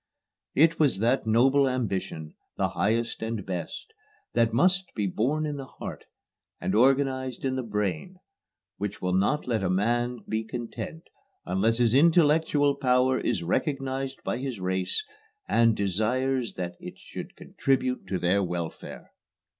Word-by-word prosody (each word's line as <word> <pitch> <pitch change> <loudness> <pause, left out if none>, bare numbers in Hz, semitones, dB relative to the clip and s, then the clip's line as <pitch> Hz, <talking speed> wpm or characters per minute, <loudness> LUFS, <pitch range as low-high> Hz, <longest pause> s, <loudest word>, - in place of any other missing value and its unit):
"It 165 +3 +4
was 140 -10 +3
that 120 +4 +1
noble 130 +5 +4
ambition, 95 -10 -3 0.2
the - - +1
highest 115 +3 0
and 110 -3 -3
best, 95 - -5 0.4
that 115 -1 +3
must 185 +8 +2
be 105 - 0
born 135 - 0
in 150 -1 -3
the 135 -1 -7
heart, - - -8 0.5
and 95 - -2
organized 130 +2 +2
in 130 -1 0
the 130 - -1
brain, 105 - -3 0.6
which 105 0 -4
will 90 0 -1
not 100 +11 +1
let 115 -4 0
a 95 - 0
man 120 +5 0
be 110 0 -1
content 120 +7 -6 0.4
unless 100 +5 +1
his 120 -2 +3
intellectual 150 -1 +4
power 130 -1 +2
is 95 -8 -1
recognized 135 - -2
by 120 - -2
his 130 -5 -4
race, 95 - -1 0.4
and 115 -1 +3
desires 115 +6 0
that 90 -1 -5
it - - -9
should - - -9
contribute 130 -5 -1
to 95 0 -1
their 90 +3 +2
welfare." 85 -3 -5
120 Hz, 145 wpm, -27 LUFS, 100-135 Hz, 0.6 s, It